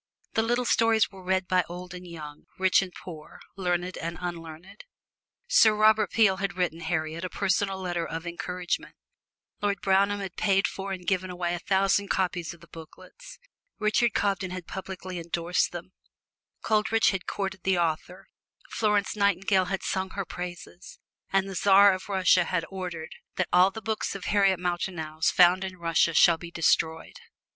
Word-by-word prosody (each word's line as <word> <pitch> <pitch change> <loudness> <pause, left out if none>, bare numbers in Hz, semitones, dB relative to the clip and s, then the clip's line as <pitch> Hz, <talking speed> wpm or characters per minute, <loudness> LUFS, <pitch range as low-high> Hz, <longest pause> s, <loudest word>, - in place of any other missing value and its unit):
The 220 - +2
little 240 +2 0
stories 225 -2 +3
were 190 -1 -12
read 185 0 0
by 180 0 +3
old 180 +1 -8
and 180 0 -9
young, 150 -3 -10
rich 190 0 +4
and 190 -2 -5
poor, 160 -4 -11 0.2
learned 180 -1 -2
and 170 +1 -4
unlearned. 170 +1 -8 0.6
Sir 225 - +5
Robert 215 0 +4
Peel 205 -4 +3
had 195 -1 -3
written 175 -3 -1
Harriet 160 0 -3
a 185 - -3
personal 195 0 0
letter 175 -2 -2
of 165 +1 -5
encouragement; 175 +1 -4 0.7
Lord 200 -1 0
Brougham 200 +1 +2
had 190 -3 -6
paid 195 -2 +2
for 195 0 -6
and 185 -2 -6
given 185 -1 0
away 175 -1 -2
a 175 - -3
thousand 195 +2 +1
copies 180 -4 -1
of 170 - -14
the 170 - -15
booklets; 485 - -13 0.4
Richard 215 +1 +1
Cobden 195 -2 0
had 185 -1 -6
publicly 185 -1 -6
endorsed 170 +1 -1
them; 175 +1 -8 0.7
Coleridge 220 +1 +2
had 190 -2 -5
courted 190 -2 -3
the 190 0 +1
author; 170 +2 -2 0.4
Florence 210 -2 +1
Nightingale 195 -2 +2
had 195 +1 -3
sung 190 0 -2
her 195 - -2
praises, 175 +1 -8 0.3
and 195 0 +2
the 195 - -6
Czar 200 +1 +6
of 185 +2 -7
Russia 185 -2 +3
had 165 - -1
ordered 180 -4 -6 0.2
that - - -1
"all 180 +1 +6
the 220 +3 -9
books 220 -2 -2
of 195 - -7
Harriet 195 -3 +3
Martineau's 175 -3 -2
found 180 +1 +5
in 190 -1 -6
Russia 165 -1 +1
shall 170 -2 +6
be 170 - -8
destroyed." 160 -1 0
185 Hz, 170 wpm, -27 LUFS, 175-195 Hz, 0.7 s, Czar